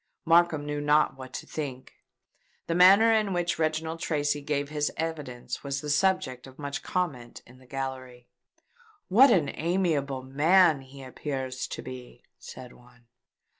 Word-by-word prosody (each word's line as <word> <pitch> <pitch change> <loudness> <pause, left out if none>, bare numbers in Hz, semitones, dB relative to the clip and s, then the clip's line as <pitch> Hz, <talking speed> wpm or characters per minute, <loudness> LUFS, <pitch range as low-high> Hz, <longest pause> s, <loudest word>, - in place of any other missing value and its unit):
Markham 165 -3 +3
knew 145 0 -3
not 150 0 +3
what 130 -1 -10
to - - -6
think. 135 -4 -6 0.7
The 165 - -2
manner 195 +6 +6
in 215 -3 +1
which 175 -2 -1
Reginald 160 +1 -1
Tracy 145 -2 -1
gave 145 0 -2
his 150 -1 -1
evidence 150 -7 -5
was 140 -1 -3
the 150 +1 -4
subject 145 -7 0
of 130 +1 -15
much 140 -1 -5
comment 140 -10 -4
in 125 +2 -18
the 130 - -20
gallery. 130 -2 -6 0.8
"What 250 +9 +7
an 170 -11 +2
amiable 155 -6 -1
man 155 +3 +4
he 135 +1 -13
appears 130 -1 -5
to - - -7
be!" 125 -1 -10 0.2
said 125 -1 -11
one. 120 -1 -22
145 Hz, 150 wpm, -27 LUFS, 130-165 Hz, 0.8 s, What